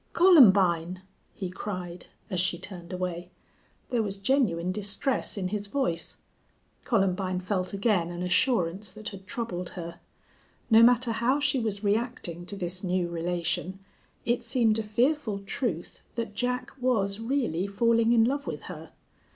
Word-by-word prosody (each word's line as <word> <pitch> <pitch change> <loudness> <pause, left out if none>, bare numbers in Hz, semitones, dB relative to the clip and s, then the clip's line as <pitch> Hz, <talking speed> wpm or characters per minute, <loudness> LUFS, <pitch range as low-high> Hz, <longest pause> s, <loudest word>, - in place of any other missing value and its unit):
"Columbine!" 190 - +5 0.3
he 185 -3 -4
cried, 180 -2 -6 0.2
as 185 - 0
she 180 -1 +2
turned 180 -2 -8
away. 180 -1 -4 0.6
There 240 -2 +2
was 200 -2 -3
genuine 195 -7 +1
distress 205 +6 -2
in 185 -2 -2
his 205 0 -3
voice. 200 -8 -2 0.7
Columbine 190 -4 +1
felt 185 -1 -2
again 200 -4 +1
an 175 +1 -5
assurance 185 -1 +1
that 215 +1 -5
had 190 -2 -11
troubled 190 -5 -4
her. 170 -1 -7 0.7
No 225 +1 +8
matter 240 0 +5
how 240 +5 +1
she 280 -2 +1
was 215 -3 -2
reacting 205 -5 -2
to 200 - -3
this 185 -1 -4
new 180 -1 0
relation, 175 +2 -2 0.5
it 240 +1 +1
seemed 230 -2 +2
a - - -1
fearful 235 +1 +1
truth 195 - -4
that 230 -3 -3
Jack 250 +3 -2
was 210 -5 +1
really 225 - -1
falling 230 +3 +2
in 230 -2 +5
love 280 +4 0
with - - -5
her. - - -9
200 Hz, 145 wpm, -28 LUFS, 180-235 Hz, 0.7 s, No